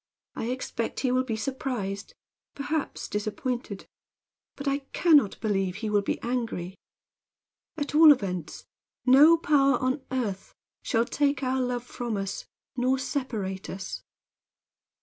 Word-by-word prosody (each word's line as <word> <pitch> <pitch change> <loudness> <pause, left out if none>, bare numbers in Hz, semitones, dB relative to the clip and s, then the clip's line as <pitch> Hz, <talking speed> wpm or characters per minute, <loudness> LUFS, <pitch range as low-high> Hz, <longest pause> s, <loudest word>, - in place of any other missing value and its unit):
I - - -3
expect 240 -2 -3
he 255 - +1
will 255 +1 +2
be 235 -4 -3
surprised; 220 -5 -4 0.4
perhaps 295 +1 -3
disappointed; 215 0 -3 0.7
but 280 - -6
I 275 +1 +1
can 335 -4 +6
not 210 -9 0
believe 195 -4 0
he 215 +1 -3
will 205 -1 +3
be 200 - -2
angry. 230 -7 -2 1.0
At 290 -1 -3
all 310 0 +9
events 185 - -1 0.4
no 290 +6 +8
power 275 -5 +3
on 255 +2 -1
earth 220 -7 -3 0.3
shall 230 -2 +1
take 285 0 0
our 260 0 +1
love 245 -1 -1
from 240 -3 -4
us 195 0 -4 0.3
nor 255 +1 +2
separate 220 -9 -3
us." 190 0 -6
250 Hz, 130 wpm, -27 LUFS, 205-275 Hz, 1.0 s, all